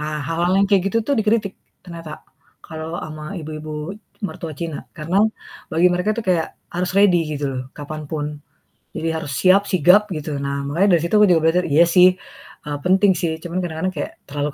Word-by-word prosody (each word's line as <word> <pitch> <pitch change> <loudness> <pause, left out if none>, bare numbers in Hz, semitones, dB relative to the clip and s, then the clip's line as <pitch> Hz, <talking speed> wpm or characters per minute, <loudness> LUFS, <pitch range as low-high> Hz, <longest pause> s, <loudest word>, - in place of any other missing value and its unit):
Ah, 150 0 -3
hal-hal 170 +3 0
yang 200 - +4
kayak 195 -3 +4
gitu 230 - +1
tuh 285 - +1
dikritik 215 -2 +1 0.3
ternyata 165 -3 -9 0.4
kalau 160 +1 -6
ama 155 +3 -7
ibu-ibu 155 +2 -6 0.3
mertua 165 -3 -7
Cina, 165 -3 -5
karena 170 +6 0 0.5
bagi 170 +3 +4
mereka 180 +4 0
tuh 230 - -3
kayak 175 -3 0 0.2
harus 180 +1 -1
ready 185 -4 +5 0.2
gitu 145 - -4
loh 130 0 -4
kapan 150 +1 -7
pun. 150 -2 -2 0.7
Jadi 165 - -2
harus 150 -3 -5
siap, 195 +2 +5
sigap 185 +4 +5
gitu. 150 -2 -4
Nah 140 0 -2
makanya 175 +6 +3
dari - - -5
situ 170 - -2
aku 210 - +7
juga 165 -2 +4
belajar, 180 +2 +1
iya 150 +4 +5
sih, 180 +1 +7 0.6
eee, 145 -1 -3
penting 190 +2 +4
sih 170 - 0
cuman 175 +1 -4
kadang-kadang 175 +2 -3
kayak - - -4 0.2
terlalu 145 +1 -2
165 Hz, 185 wpm, -21 LUFS, 155-185 Hz, 0.7 s, aku